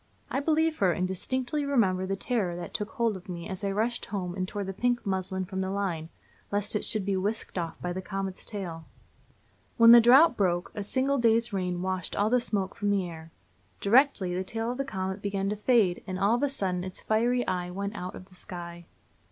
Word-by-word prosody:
I -, -, +1 dB
believe 320 Hz, +2 st, +1 dB
her, 190 Hz, -3 st, +3 dB
and 185 Hz, +2 st, -1 dB
distinctly 260 Hz, -, -2 dB
remember 195 Hz, -10 st, +1 dB
the 195 Hz, -, -1 dB
terror 195 Hz, -5 st, -1 dB
that 175 Hz, -, -7 dB
took 210 Hz, 0 st, -2 dB
hold 235 Hz, -5 st, +1 dB
of 185 Hz, 0 st, -11 dB
me 170 Hz, -1 st, -5 dB
as 190 Hz, +1 st, -6 dB
I 200 Hz, -, 0 dB
rushed 225 Hz, +4 st, -1 dB
home 180 Hz, -4 st, -4 dB
and 185 Hz, 0 st, -2 dB
tore 205 Hz, +1 st, -4 dB
the 195 Hz, 0 st, -4 dB
pink 245 Hz, +4 st, 0 dB
muslin 190 Hz, -1 st, -1 dB
from 190 Hz, +1 st, -4 dB
the 190 Hz, -, -2 dB
line, 185 Hz, -5 st, -2 dB, 0.4 s
lest 205 Hz, +1 st, 0 dB
it 210 Hz, -, 0 dB
should 215 Hz, -3 st, -1 dB
be 200 Hz, -1 st, 0 dB
whisked 205 Hz, +4 st, -2 dB
off 170 Hz, -3 st, -3 dB
by 180 Hz, 0 st, -3 dB
the 185 Hz, -, -4 dB
comet's 195 Hz, -1 st, -4 dB
tail. 175 Hz, -6 st, -5 dB, 0.9 s
When 230 Hz, 0 st, +9 dB
the 235 Hz, 0 st, +10 dB
drought 255 Hz, +5 st, +7 dB
broke, 180 Hz, -4 st, 0 dB
a 205 Hz, -, -4 dB
single 265 Hz, +6 st, +1 dB
day's 230 Hz, -1 st, +3 dB
rain 180 Hz, -2 st, -1 dB
washed 185 Hz, -2 st, -2 dB
all 210 Hz, +2 st, +1 dB
the 250 Hz, -, +5 dB
smoke 200 Hz, -5 st, -1 dB
from 205 Hz, -, -2 dB
the 195 Hz, -3 st, +1 dB
air. 160 Hz, -1 st, -9 dB, 0.5 s
Directly, 220 Hz, -5 st, +3 dB
the 185 Hz, +1 st, -1 dB
tail 225 Hz, +4 st, -3 dB
of 250 Hz, -, -6 dB
the 275 Hz, -, 0 dB
comet 190 Hz, -3 st, -4 dB
began 195 Hz, -1 st, -1 dB
to 210 Hz, -, -1 dB
fade, 210 Hz, -4 st, +2 dB
and 185 Hz, -1 st, -3 dB
all 200 Hz, +4 st, +3 dB
of 240 Hz, -, +1 dB
a 285 Hz, -, +2 dB
sudden 185 Hz, -8 st, -2 dB
its 185 Hz, 0 st, -4 dB
fiery 240 Hz, +3 st, +1 dB
eye 180 Hz, -1 st, -2 dB
went 200 Hz, +4 st, -4 dB
out 180 Hz, -3 st, -5 dB
of 185 Hz, -, -10 dB
the 190 Hz, -, -22 dB
sky. 175 Hz, -2 st, -8 dB
195 Hz, 225 wpm, -28 LUFS, 185-230 Hz, 0.9 s, the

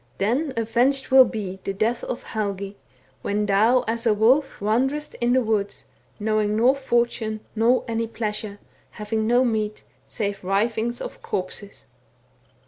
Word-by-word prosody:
Then 255 Hz, +9 st, 0 dB
avenged 245 Hz, +5 st, +1 dB
will 260 Hz, -1 st, +9 dB
be 195 Hz, -5 st, -5 dB
The 195 Hz, -, -2 dB
death 225 Hz, +5 st, 0 dB
of 245 Hz, -, -4 dB
Helgi, 200 Hz, -2 st, -4 dB, 0.5 s
When 210 Hz, +1 st, -1 dB
thou, 220 Hz, +5 st, +4 dB
as 230 Hz, +1 st, -1 dB
a 215 Hz, -, +4 dB
wolf, 260 Hz, +7 st, +3 dB
t 200 Hz, -, -7 dB
Wanderest 270 Hz, +7 st, 0 dB
in 240 Hz, +1 st, +3 dB
the 260 Hz, 0 st, +3 dB
woods. 210 Hz, -2 st, -2 dB, 0.3 s
Knowing 215 Hz, 0 st, +1 dB
nor 250 Hz, +4 st, +4 dB
fortune 235 Hz, -4 st, -1 dB
Nor 235 Hz, +3 st, +3 dB
any 230 Hz, 0 st, -1 dB
pleasure. 210 Hz, -2 st, -4 dB, 0.4 s
Having 215 Hz, +1 st, -2 dB
no 245 Hz, +2 st, +4 dB
meat, 215 Hz, -2 st, -2 dB, 0.2 s
Save 205 Hz, -4 st, -3 dB
rivings 220 Hz, +5 st, 0 dB
of -, -, -7 dB
corpses. 195 Hz, +2 st, -5 dB
220 Hz, 145 wpm, -24 LUFS, 210-240 Hz, 0.5 s, will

